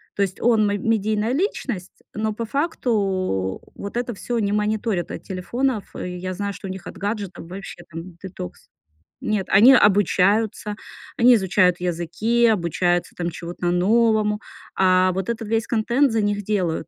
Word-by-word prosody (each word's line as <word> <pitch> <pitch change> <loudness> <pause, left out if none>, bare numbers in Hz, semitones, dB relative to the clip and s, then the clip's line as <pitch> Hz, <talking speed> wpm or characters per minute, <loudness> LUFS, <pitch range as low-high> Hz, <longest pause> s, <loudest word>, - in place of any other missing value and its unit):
То 200 - -1
есть 195 -1 -1
он 225 -3 +4
мэ 205 0 0
медийная 220 +1 0
личность, 265 - -3
но 215 0 -1
по 230 +2 -4
факту 200 - -1
вот 200 +3 -6
это 240 -1 -2
всё 240 +4 -4
они 205 -3 0
мониторят 210 -3 0
от - - -7
телефонов. 220 +4 -2
И 180 0 -5
я 185 +1 -4
знаю, 200 +2 -3
что 200 0 -8
у - - -4
них 190 -1 -8
от - - -9
гаджетов 200 -4 -4
вообще 185 -2 -8
там 165 +2 -8
детокс. 175 - -8 0.5
Нет, 210 -3 -1
они 225 +7 +8
обучаются, 205 0 +3 0.4
они 245 +1 +7
изучают 185 -3 +2
языки, 180 +7 +1
обучаются 175 -3 +1
там 175 -1 -2
чему-то 175 +1 -5
новому. 210 +3 +2 0.4
А 185 0 +4
вот 190 +2 -3
этот 230 -2 -3
весь 225 +1 0
контент 240 +4 +2
за 225 - +1
них 205 0 -1
делают. 185 -6 -1
205 Hz, 160 wpm, -22 LUFS, 185-225 Hz, 0.5 s, они